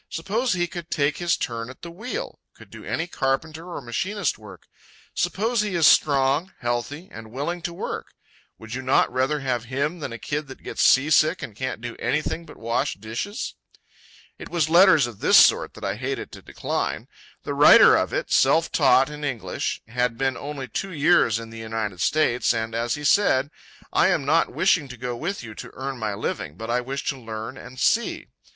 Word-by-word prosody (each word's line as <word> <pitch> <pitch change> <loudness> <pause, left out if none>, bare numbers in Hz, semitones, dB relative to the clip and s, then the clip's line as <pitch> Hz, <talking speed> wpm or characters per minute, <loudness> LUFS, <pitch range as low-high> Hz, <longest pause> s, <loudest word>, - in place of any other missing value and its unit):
Suppose 220 +9 -1
he 175 -1 +1
could 175 -1 -8
take 145 0 0
his 175 -1 +1
turn 115 0 -4
at 130 - -13
the 170 - -7
wheel, 245 - -6 0.2
could - - -16
do - - -11
any 165 - -2
carpenter 160 +2 -2
or 145 - -5
machinist 180 - -2
work. 105 -2 -13 0.5
Suppose 210 +7 0
he 205 -3 -2
is 165 -2 +3
strong, 140 +4 +4
healthy, 120 +8 -3
and 110 -6 -10
willing 150 +8 -3
to 170 - -4
work. 170 - -6 0.4
Would 110 0 -10
you 130 - -3
not 130 -1 +2
rather 135 +3 0
have 125 -4 -2
him 140 +7 -2
than 145 - -5
a 115 - -6
kid 145 +6 -4
that 135 - -12
gets - - -4
seasick 155 +5 +4
and 105 - -7
can't 130 -1 -4
do 120 -1 -6
anything 155 +3 -2
but - - -13
wash 115 +1 -1
dishes?" 115 - -5 0.9
It - - -9
was 160 -3 0
letters 170 -5 +7
of 120 -4 -8
this - - +5
sort - - +5
that - - -7
I 100 +1 -2
hated 135 +3 -4
to - - -11
decline. - - -3 0.4
The - - -3
writer - - +8
of - - 0
it, - - -3
self 160 +5 +3
taught 135 -3 +4
in 150 0 -8
English, 135 -6 -3
had 125 0 -1
been 135 -1 0
only 140 -2 -6
two 195 - -4
years 150 - +3
in 115 0 -8
the 115 - -9
United 110 -5 -4
States, 125 -6 +2
and, 115 0 -3
as 115 +1 -1
he 150 - -8
said, 145 -5 +3 0.4
"I - - +4
am 140 - +1
not 160 +4 +2
wishing 180 -6 +2
to 125 -1 -10
go 125 +1 -4
with 170 +8 -4
you 110 -2 -8
to - - -9
earn 135 -1 -5
my 105 -2 -2
living, 75 -5 -4
but 115 +2 -5
I 125 +1 +1
wish 135 +2 -5
to 135 - -3
learn 110 -2 -6
and 125 +1 -11
see." 235 +1 +1
135 Hz, 200 wpm, -24 LUFS, 120-165 Hz, 0.9 s, writer